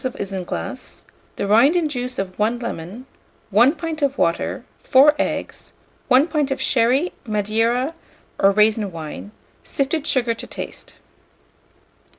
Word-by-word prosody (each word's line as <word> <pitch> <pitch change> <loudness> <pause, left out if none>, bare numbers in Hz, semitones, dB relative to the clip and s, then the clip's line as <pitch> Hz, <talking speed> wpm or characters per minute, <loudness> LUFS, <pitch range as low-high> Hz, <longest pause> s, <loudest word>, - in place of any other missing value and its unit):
of 255 -1 -3
isinglass, 185 - -6 0.3
the - - -2
rind 230 - +5
and 325 -4 +1
juice 250 -2 -4
of 190 0 -4
1 220 +3 +1
lemon, 235 0 -6 0.5
1 240 - +5
pint 325 -1 -5
of 280 -1 0
water, 200 +9 -1 0.2
4 280 +3 +6
eggs, - - -3 0.3
1 260 +2 +5
pint 300 -4 0
of 270 - -2
sherry, 260 +8 +2
Madeira, 225 +6 0 0.5
or 195 - +5
raisin 210 0 +2
wine; 165 +4 -8 0.3
sifted 290 +2 -2
sugar 245 -3 +1
to 230 - -9
taste. - - -8
240 Hz, 135 wpm, -21 LUFS, 205-275 Hz, 0.5 s, 4